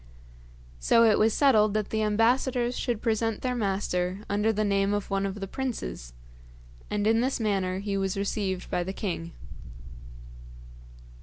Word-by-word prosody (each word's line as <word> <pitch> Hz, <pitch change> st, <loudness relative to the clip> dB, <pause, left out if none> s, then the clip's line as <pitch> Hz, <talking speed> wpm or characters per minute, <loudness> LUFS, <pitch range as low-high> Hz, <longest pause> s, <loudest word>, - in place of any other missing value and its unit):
So 230 Hz, -, +4 dB
it 220 Hz, -2 st, +4 dB
was 220 Hz, +1 st, +4 dB
settled 215 Hz, -6 st, +3 dB
that 215 Hz, -1 st, -1 dB
the 220 Hz, -, 0 dB
ambassadors 240 Hz, +3 st, +1 dB
should 235 Hz, -3 st, -2 dB
present 225 Hz, -1 st, 0 dB
their 255 Hz, -1 st, 0 dB
master 195 Hz, -4 st, -1 dB
under 210 Hz, +2 st, +1 dB
the 215 Hz, 0 st, -1 dB
name 200 Hz, 0 st, +1 dB
of 205 Hz, -1 st, -4 dB
one 195 Hz, 0 st, 0 dB
of 195 Hz, +1 st, -6 dB
the 195 Hz, -, -3 dB
princes, -, -, -5 dB, 0.8 s
and 210 Hz, 0 st, -1 dB
in 225 Hz, +1 st, +3 dB
this 260 Hz, +1 st, 0 dB
manner 195 Hz, -4 st, 0 dB
he 200 Hz, +1 st, -3 dB
was 195 Hz, 0 st, -1 dB
received 195 Hz, -2 st, -2 dB
by 180 Hz, -, 0 dB
the 190 Hz, +2 st, -5 dB
king. 170 Hz, -5 st, -4 dB
210 Hz, 155 wpm, -27 LUFS, 195-225 Hz, 0.8 s, So